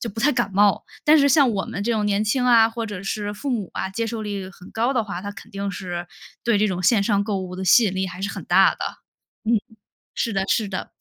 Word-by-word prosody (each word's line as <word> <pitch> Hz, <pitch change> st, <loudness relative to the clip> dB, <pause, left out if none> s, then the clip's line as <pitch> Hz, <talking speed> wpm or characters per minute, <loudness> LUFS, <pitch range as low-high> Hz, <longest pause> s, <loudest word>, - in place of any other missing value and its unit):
就 235 Hz, -, -4 dB
不 225 Hz, -, -6 dB
太 290 Hz, +5 st, +4 dB
感 240 Hz, -4 st, 0 dB
冒。 205 Hz, 0 st, +3 dB, 0.2 s
但 310 Hz, +1 st, +6 dB
是 280 Hz, 0 st, +4 dB
像 275 Hz, -2 st, +5 dB
我 200 Hz, -3 st, -1 dB
们 200 Hz, -, -5 dB
这 235 Hz, -, -1 dB
种 210 Hz, -2 st, 0 dB
年 205 Hz, +1 st, +1 dB
轻 250 Hz, +4 st, +1 dB
啊， 230 Hz, -2 st, +6 dB
或 230 Hz, 0 st, -4 dB
者 205 Hz, -3 st, -6 dB
是 205 Hz, +1 st, -3 dB
父 280 Hz, +6 st, -4 dB
母 215 Hz, -7 st, -2 dB
啊， 190 Hz, -, -3 dB
接 230 Hz, +4 st, -2 dB
受 225 Hz, -1 st, -4 dB
力 200 Hz, -3 st, -4 dB
很 185 Hz, -1 st, -14 dB
高 235 Hz, +4 st, 0 dB
的 235 Hz, -, +2 dB
话， 185 Hz, -3 st, -5 dB
他 200 Hz, +1 st, -5 dB
肯 -, -, -13 dB
定 200 Hz, 0 st, -4 dB
是 175 Hz, -2 st, -5 dB, 0.4 s
对 235 Hz, -2 st, +3 dB
这 210 Hz, 0 st, +2 dB
种 180 Hz, -1 st, -2 dB
线 210 Hz, +2 st, +4 dB
上 200 Hz, -1 st, +1 dB
购 205 Hz, -2 st, -1 dB
物 185 Hz, -1 st, -6 dB
的 190 Hz, -, -4 dB
吸 190 Hz, +7 st, +6 dB
引 195 Hz, -, 0 dB
力 190 Hz, 0 st, -1 dB
还 180 Hz, +1 st, -8 dB
是 200 Hz, -, -1 dB
很 -, -, -7 dB
大 -, -, +5 dB
的。 -, -, -25 dB, 0.7 s
嗯， 225 Hz, 0 st, +3 dB, 0.6 s
是 230 Hz, -, -1 dB
的， 195 Hz, -1 st, 0 dB
是 215 Hz, -3 st, +1 dB
的， 185 Hz, -, -5 dB
205 Hz, 290 characters per minute, -23 LUFS, 195-230 Hz, 0.7 s, 但